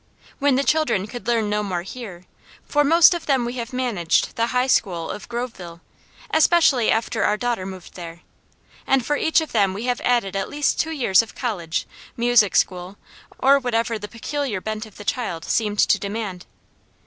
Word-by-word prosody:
When 280 -1 +3
the 275 - +1
children 305 -11 +1
could 240 +3 -9
learn 230 -3 +1
no 210 0 0
more 185 -4 -3
here, 195 -4 -9 0.4
for 295 0 +2
most 330 +4 +6
of 345 - -5
them 265 -4 +2
we 240 +2 -4
have 235 0 -5
managed 240 -10 0
the 230 0 +1
high 250 +1 +1
school 180 -10 0
of 210 - -8
Groveville, 225 -9 -6 0.5
especially 315 -7 +4
after 225 0 0
our 210 - +2
daughter 235 -5 -2
moved 185 -2 -10
there, 170 -1 -9 0.7
and 265 -3 +2
for 295 - +1
each 320 +2 +2
of 315 - -6
them 200 -4 +2
we 210 - -5
have 245 0 -1
added 235 -6 +1
at 195 - -2
least 290 -1 0
two 320 - 0
years 240 -11 +3
of 230 - -11
college, 180 -10 -3 0.3
music 235 -4 +3
school, 180 +2 0 0.4
or 275 +1 +5
whatever 230 -3 -1
the 210 - -6
peculiar 245 -1 -3
bent 215 +2 -5
of 215 - -17
the 205 - -10
child 175 -11 -3
seemed 210 -2 0
to - - +3
demand. 200 -3 -5
230 Hz, 185 wpm, -22 LUFS, 195-255 Hz, 0.7 s, most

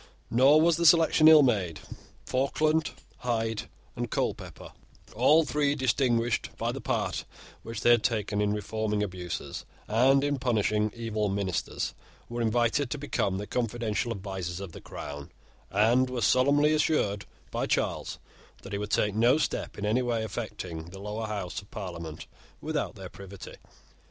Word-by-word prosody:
Nor 135 +6 +6
was 165 0 +4
the 170 - 0
selection 160 -1 +6
ill 155 -2 +9
made. 95 - +1 0.5
Falkland, 155 +4 +1 0.3
Hyde, 115 -3 -2 0.3
and - - -3
Colepepper, - - -3 0.4
all 150 +8 +5
three 145 -1 +1
distinguished 120 -3 +1
by - - -1
the - - -6
part - - -1 0.4
which 115 -2 -6
they 120 - +5
had 120 -2 +5
taken 105 -4 0
in 105 0 +1
reforming 105 0 -1
abuses 90 -3 -5 0.2
and 130 +5 +4
in 145 -1 0
punishing 110 -3 +1
evil 110 -3 -2
ministers, 95 -3 -2 0.4
were 120 0 -3
invited 120 +4 +1
to 150 - -3
become 120 -9 -1
the 105 - -4
confidential 115 -2 -2
advisers 95 -4 -4
of 100 -3 -7
the - - -11
Crown, 70 0 -8 0.4
and 115 +6 +3
were 125 -2 -3
solemnly 145 +7 +4
assured 150 -10 +1 0.3
by - - -1
Charles - - -1 0.5
that 100 - -9
he 100 - -1
would 105 0 -4
take 105 -1 +1
no 120 +6 +4
step 155 - -2
in 105 - -3
any 110 +4 +2
way 120 -3 -1
affecting 100 -7 -5
the 90 +3 -11
Lower 105 +2 -4
House 100 -2 -4
of 100 - -20
Parliament 85 -6 -7 0.3
without - - -3
their - - -8
privity. 100 -1 -10
110 Hz, 155 wpm, -28 LUFS, 100-130 Hz, 0.5 s, ill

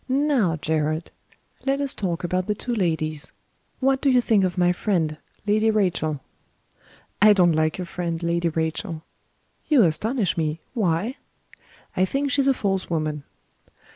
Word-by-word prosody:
"Now, 265 - +2
Gerard, 155 +1 -1 0.5
let 275 +1 0
us 280 -1 -1
talk 180 -3 -3
about 180 +1 -1
the 210 - 0
two 245 +3 -4
ladies. 160 -7 -1 0.5
What 270 0 +2
do 280 - +3
you 255 -1 +5
think 220 -4 +3
of 185 -1 -1
my 175 0 +4
friend, 175 -5 0 0.3
Lady 215 +1 +3
Rachel?" 175 -9 0 1.0
"I 210 0 +8
don't 180 -4 +4
like 155 0 +1
your 180 - -4
friend, 170 -1 -4
Lady 170 0 +1
Rachel." 160 0 -3 0.7
"You 285 -7 +6
astonish 200 - +1
me. 155 0 -1
Why?" 210 - 0 0.8
"I 185 - +3
think 275 +7 -1
she's 275 +1 +3
a 275 - +5
false 195 -4 -1
woman." 155 -3 -2
180 Hz, 150 wpm, -24 LUFS, 160-225 Hz, 1.0 s, I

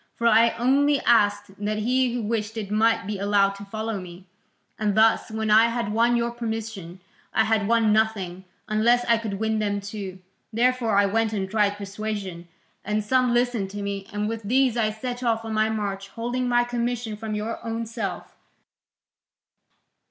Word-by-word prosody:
For 235 - -4
I 230 0 +5
only 280 +4 +3
asked 205 -3 +2
that 215 +1 -1
he 250 +3 +1
who 240 -1 -3
wished 220 0 -2
it 205 -2 -5
might 220 0 +2
be 205 0 -4
allowed 200 0 +3
to 200 - -9
follow 220 +1 -4
me. 180 +1 -11 0.5
And 210 -2 0
thus, 220 +1 +4
when 220 0 -2
I 220 +2 +7
had 230 -3 -2
won 235 +2 +3
your 235 0 0
permission, 220 -6 -5 0.4
I 220 - +5
had 220 -2 +1
won 225 -2 +3
nothing, 200 -5 0 0.2
unless 235 +3 +3
I 230 -1 +3
could 215 -3 -4
win 220 +1 -1
them 205 -1 -1
too. 200 -2 -7 0.3
Therefore 235 -2 +1
I 200 - +5
went 220 +2 0
and 195 -2 -2
tried 205 0 +1
persuasion, 200 -3 -5 0.4
and 210 +1 -1
some 255 +3 +2
listened 240 -5 +1
to 205 +1 -6
me, 200 -1 -4
and 210 0 -2
with 225 0 -4
these 250 +3 +2
I 225 -2 +1
set 245 +3 -5
off 225 -2 0
on 225 - -4
my 215 0 +2
march, 200 -2 -3
holding 245 +4 -3
my 240 0 +3
commission 240 -2 -2
from 215 0 -5
your 215 +2 -4
own 230 0 -3
self. 225 - -5
220 Hz, 180 wpm, -24 LUFS, 205-235 Hz, 0.5 s, I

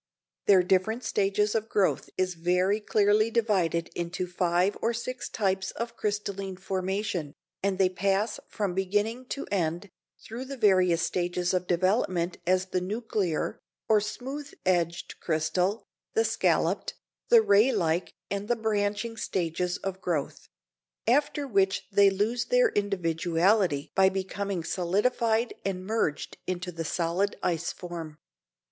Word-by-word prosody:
Their 190 -3 +6
different 195 +7 +1
stages 205 +1 +1
of 220 0 -1
growth 200 -2 +1
is 185 -1 +1
very 180 +4 +1
clearly 210 +1 +3
divided 195 -8 +1
into 175 +1 -3
five 180 +2 +1
or 230 +1 +1
six 250 +2 -5
types 190 -2 0
of 235 +1 -5
crystalline 200 -2 -3
formation, 190 -4 -2 0.3
and 195 -1 0
they 190 -1 +4
pass 195 +3 0
from 200 -4 -2
beginning 210 +6 -1
to 275 - -4
end, 175 0 -1 0.3
through 235 +4 -7
the 275 +1 -7
various 185 -6 +4
stages 175 +1 -1
of 180 -1 0
development 185 -1 +1
as 185 0 +3
the 185 -1 -2
nuclear, 200 -4 -2 0.3
or 215 -1 +4
smooth 265 +7 -5
edged 175 -2 0
crystal, 180 +6 0 0.3
the 450 +1 +3
scalloped, - - +1 0.3
the 465 -2 +7
ray 210 - +5
like 170 -2 0 0.2
and 200 +1 -2
the 240 - +2
branching 220 0 -1
stages 180 -2 -1
of 190 -1 -5
growth; 160 -6 -3 0.6
after 285 +3 +2
which 195 -4 +1
they 200 0 +6
lose 215 +5 0
their - - +4
individuality 175 - +1
by 190 0 +5
becoming 190 -1 -3
solidified 220 +7 +1
and 185 -1 -3
merged 215 -8 -1
into 180 0 -3
the 165 -1 -4
solid 175 +5 0
ice 170 -1 0
form. 165 -4 -7
195 Hz, 135 wpm, -28 LUFS, 180-215 Hz, 0.6 s, the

